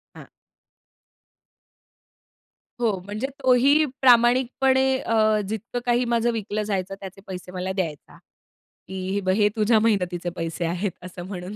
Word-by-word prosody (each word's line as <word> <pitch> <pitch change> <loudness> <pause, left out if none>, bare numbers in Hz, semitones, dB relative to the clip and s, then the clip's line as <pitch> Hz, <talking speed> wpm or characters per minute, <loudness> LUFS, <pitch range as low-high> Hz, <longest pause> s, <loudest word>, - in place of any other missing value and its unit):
हां. - - -12 2.5
हो, 220 -5 0
म्हणजे 210 +6 -3 0.2
तोही 270 +5 +5 0.2
प्रामाणिकपणे 260 +2 +4
अ, 215 -3 +2
जितकं 220 +3 -4
काही 245 0 +2
माझं 235 0 +1
विकलं 215 -1 -3
जायचं, 195 -2 -3
त्याचे 195 0 -10
पैसे 180 -1 -7
मला 185 0 -3
द्यायचा, 170 -6 -5 0.7
की 190 -1 -5
"हे 200 - 0
बघ 185 0 +1
हे 210 0 +3
तुझ्या 220 +1 +3
मेहनतीचे 180 -5 0
पैसे 165 0 -3
आहेत," 180 +4 -2
असं 180 -1 -8
म्हणून. 185 0 -7
210 Hz, 130 wpm, -24 LUFS, 185-240 Hz, 2.5 s, तोही